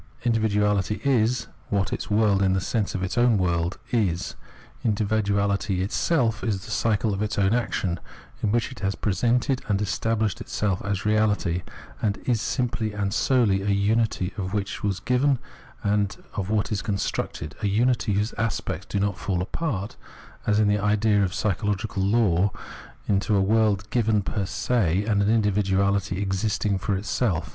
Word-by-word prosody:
Individuality 105 -3 +1
is 125 -3 +2 0.2
what 100 -2 0
its - - -4
world, 105 -2 +3
in 95 -1 +3
the 95 - +2
sense 105 +3 -1
of 95 - -2
its 95 +5 -1
own 120 -3 +4
world, 85 -1 0
is. 95 -8 0 0.5
Individuality 100 -3 +1
itself 115 - +1
is 105 -4 -2
the - - -8
cycle 110 -1 +1
of 100 - -3
its 105 0 -2
own 100 +1 +3
action, 95 -7 -1 0.4
in 105 - +1
which 115 +2 0
it 130 - -10
has 95 0 -1
presented 120 +5 +1
and 100 -2 +1
estabhshed 110 0 -1
itself 100 -3 -1
as 100 -1 -1
reahty, 105 -4 +1 0.4
and 105 -2 0
is 120 -4 +1
simply 115 -4 -1
and 100 -1 -1
solely 115 -5 +2
a 100 - -4
unity 100 -1 +1
of 95 0 -3
what 100 -1 -1
is 100 -2 0
given 130 +2 +2 0.5
and 105 0 +1 0.2
what 105 +2 -1
is 105 -1 0
constructed 95 -6 -3
— - - -16
a 105 - +1
unity 110 +1 +2
whose 105 +3 0
aspects 115 -1 -2
do 100 - -1
not 100 -1 -1
fall 95 -3 -1
apart, 100 - -3 0.5
as 105 0 +3
in 105 - +4
the 105 0 +2
idea 105 0 +2
of 95 - 0
psychological 100 +1 -1
law, 100 -2 +3 0.6
into 100 +1 +2
a - - +4
world 105 0 +2
given 110 -4 +2
per 100 -1 -2
se 100 -3 +1
and 105 -2 +2
an 110 +2 +3
individuahty 100 -1 +1
ex 95 -1 -1
isting 105 -2 0
for 100 - 0
itself. 100 -4 -1
105 Hz, 165 wpm, -25 LUFS, 100-110 Hz, 0.6 s, own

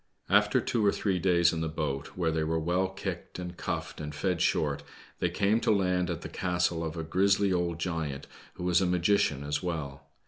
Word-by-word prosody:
After - - +5
two 115 - 0
or 100 - +5
three 95 -3 0
days 85 -1 +4
in 80 - -2
the 80 - -1
boat 75 -2 -4
where 85 -3 +1
they 80 0 0
were 80 +1 0
well 90 +4 +1
kicked 95 -2 -6
and 90 -1 -6
cuffed - - -4
and 75 -1 -6
fed 90 +2 -1
short, 75 -2 +1 0.4
they - - +1
came 105 +3 +2
to - - -1
land 90 -4 +2
at 85 -1 -3
the - - -5
castle 90 -2 0
"hf 80 -1 -3
a 80 - -2
grisly 95 +3 +2
old 85 -2 0
giant, 80 -5 -3 0.3
who 90 - -7
was 90 0 +3
a 95 - +2
magician 90 -5 +2
as 75 0 -1
well. 70 -5 -4
85 Hz, 210 wpm, -29 LUFS, 80-90 Hz, 0.4 s, After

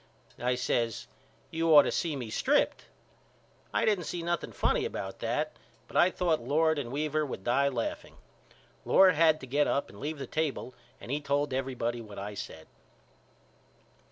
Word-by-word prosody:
I 125 +1 +1
says 120 -2 -1 0.5
You 165 0 0
ought 145 - +10
to - - -1
see 165 -4 -1
me 120 -5 -5
stripped. - - +1 0.9
I - - +1
didn't 200 -6 +1
see 170 +1 -4
nothing 170 0 -2
funny - - +1
about 95 0 -5
that 135 +7 -2 0.3
but - - -14
I 175 - +6
thought 170 -6 0
Lord 155 +5 +2
and 120 -4 -5
Weaver 155 +2 0
would 130 -9 -5
die 140 +5 +2
laughing. 120 -4 -4 0.7
Lord 190 -1 +6
had 160 0 +4
to - - -7
get 145 +3 +1
up 140 - 0
and 100 - -13
leave 155 +2 -4
the 135 - -5
table 145 -2 -2 0.3
and - - -8
he 145 +2 -1
told 145 -1 0
everybody 125 -3 -2
what 105 -2 -11
I 100 +1 -5
said. 80 -5 -8
140 Hz, 170 wpm, -30 LUFS, 120-155 Hz, 0.9 s, ought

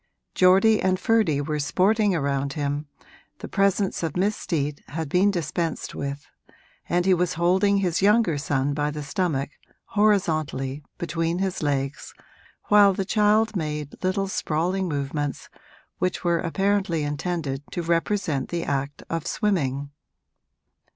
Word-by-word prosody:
Geordie 195 +4 +5
and 185 0 +1
Ferdy 210 -9 +2
were 150 +1 -2
sporting 200 +6 +2
around 140 -2 -1
him, 145 0 -2 0.5
the - - -7
presence 195 0 +1
of 165 -1 -2
Miss 200 +3 +1
Steet 150 -6 -2
had 160 0 -4
been 180 +7 +3
dispensed 165 -3 -2
with, 140 +1 -5 0.6
and 175 +1 +1
he 190 - +5
was 180 -2 0
holding 190 +4 +3
his 180 -3 0
younger 200 -6 +3
son 140 -1 0
by 145 +1 0
the 150 0 -5
stomach, 145 -3 -1 0.4
horizontally, 155 -10 +1 0.2
between 165 0 -1
his 190 -1 -2
legs, 140 -2 -2 0.5
while 205 -2 +5
the 195 - -2
child 215 +2 +2
made 150 -3 -4
little 190 +1 0
sprawling 180 +2 -1
movements 145 -1 -3 0.5
which 180 +1 -1
were 170 -1 +2
apparently 190 -2 0
intended 145 -2 -3
to 175 - -4
represent 165 -4 0
the 170 -1 -2
act 140 0 -3
of 165 -2 -3
swimming. 145 - -1
170 Hz, 135 wpm, -24 LUFS, 145-195 Hz, 0.6 s, Geordie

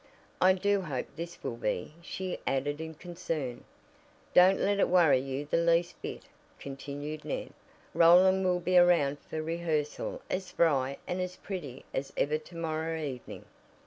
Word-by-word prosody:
"I 185 +1 +7
do 200 +1 +1
hope 140 -8 -5
his 170 +2 -6
will 115 - -3
be," 105 +2 -2
she 185 +1 -5
added 145 +3 -1
in 160 0 -6
concern. 160 -7 -4 0.7
"Don't 185 +2 +6
let 200 0 +1
it - - +3
worry 170 -7 +5
you 135 +2 -4
the 150 - 0
least 170 +1 +2
bit," - - -6 0.4
continued 145 +2 -6
Ned. - - -4 0.4
"Roland 185 +3 +6
will 180 -1 +2
be 180 +1 +4
around 165 -5 +4
for 155 0 -3
rehearsal 170 - -2
as 185 0 -3
spry 140 -6 +1
and 180 +1 -2
as 180 0 -4
pretty 155 -11 -7
as 135 +1 -3
ever 150 +2 +1
to 165 +3 -15
morrow 160 0 -2
evening." 135 -5 -6
165 Hz, 155 wpm, -30 LUFS, 145-180 Hz, 0.7 s, I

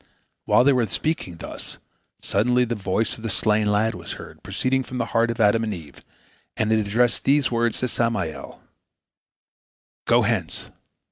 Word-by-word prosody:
While - - +5
they 140 +1 +5
were 120 -3 +2
speaking 105 - -2
thus, - - -8 0.5
suddenly 125 +5 +2
the 120 - -2
voice 105 +1 -1
of - - -12
the 115 - -3
slain 105 +1 +1
lad 110 +2 +2
was - - -7
heard - - -11
proceeding 130 +1 0
from 130 0 -6
the 120 - 0
heart 115 +1 +3
of 115 0 -3
Adam 110 +1 +4
and 110 -2 -2
Eve, 80 -4 -12 0.5
and 110 0 +1
it 110 - +4
addressed 120 +3 +1
these 140 -1 +3
words 115 -1 +1
to 125 - +1
Samael: 115 -10 -3 1.4
"Go - - +5
hence! - - -1
115 Hz, 165 wpm, -23 LUFS, 105-125 Hz, 1.4 s, While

